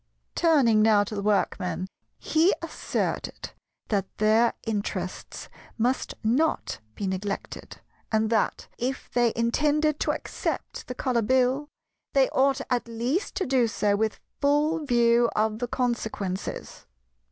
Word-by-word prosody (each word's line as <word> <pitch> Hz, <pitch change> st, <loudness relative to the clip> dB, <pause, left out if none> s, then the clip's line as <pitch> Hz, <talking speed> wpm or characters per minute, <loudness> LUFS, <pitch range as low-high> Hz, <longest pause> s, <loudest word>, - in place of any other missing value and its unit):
Turning 270 Hz, -10 st, +4 dB
now 215 Hz, -1 st, +5 dB
to 205 Hz, -, -7 dB
the 205 Hz, -, -2 dB
Workmen 185 Hz, -4 st, 0 dB, 0.3 s
he 325 Hz, +5 st, +3 dB
asserted -, -, -3 dB, 0.4 s
that 200 Hz, -3 st, 0 dB
their 220 Hz, +2 st, +4 dB
interests 210 Hz, -2 st, -4 dB, 0.3 s
must 245 Hz, +3 st, 0 dB
not 255 Hz, -, +1 dB, 0.2 s
be 200 Hz, -, -4 dB
neglected, 195 Hz, +1 st, -4 dB, 0.3 s
and 220 Hz, 0 st, +1 dB
that, 220 Hz, -2 st, 0 dB
if 260 Hz, +3 st, -3 dB
they 240 Hz, -1 st, +3 dB
intended 300 Hz, +6 st, +1 dB
to -, -, -1 dB
accept -, -, -4 dB
the 250 Hz, -, -5 dB
Colour 250 Hz, -2 st, 0 dB
Bill, 260 Hz, +5 st, +2 dB, 0.5 s
they 270 Hz, -1 st, +4 dB
ought 270 Hz, 0 st, +2 dB
at 245 Hz, -2 st, 0 dB
least 240 Hz, -, -2 dB
to 380 Hz, -, 0 dB
do 255 Hz, -3 st, +3 dB
so 205 Hz, -1 st, +1 dB
with 220 Hz, +1 st, -1 dB, 0.2 s
full 295 Hz, +3 st, +2 dB
view 235 Hz, -1 st, +4 dB
of 215 Hz, 0 st, +1 dB
the 245 Hz, -, -2 dB
consequences. 220 Hz, -7 st, -3 dB
235 Hz, 130 wpm, -26 LUFS, 215-265 Hz, 0.5 s, now